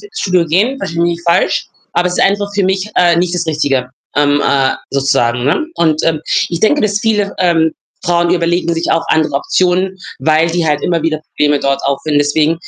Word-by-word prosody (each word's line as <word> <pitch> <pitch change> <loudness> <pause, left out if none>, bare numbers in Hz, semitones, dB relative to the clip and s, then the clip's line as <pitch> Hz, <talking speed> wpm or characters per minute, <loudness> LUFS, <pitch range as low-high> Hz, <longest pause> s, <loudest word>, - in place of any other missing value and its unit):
Fitnessstudio 200 - -1
gehen, 210 - +1
versteh 165 - -5
mich 170 - +2
nicht 170 - -15
falsch. 170 - +1 0.2
Aber 180 +1 +1
es 180 - -3
ist - - +4
einfach 200 +1 +1
für 200 -2 0
mich, 190 +2 -1
äh, 175 -2 +4
nicht 175 0 0
das 170 -1 -2
Richtige, 140 -5 -1 0.3
ähm, 145 0 +3
äh, 135 -1 +2 0.2
sozusagen, 125 -3 +1
ne, 160 - +1
und, 155 -2 +1
ähm, 155 -2 +1 0.3
ich 170 - -3
denke, 290 +7 +3
dass 205 -1 +1
viele, 210 -3 0
ähm, 165 -3 +2 0.3
Frauen, 175 0 +1
die - - +4
überlegen 170 0 0
sich 165 - -2
auch 165 0 +1
andere 155 -3 +1
Optionen, 185 +5 +1 0.3
weil 160 +1 +2
die 170 0 -1
halt 150 -1 +1
immer 170 -3 0
wieder 155 -1 -1
Probleme 145 -1 +1
dort 140 0 0
auffinden. 140 +2 0
Deswegen 150 +3 +1
165 Hz, 205 wpm, -14 LUFS, 150-180 Hz, 0.3 s, ist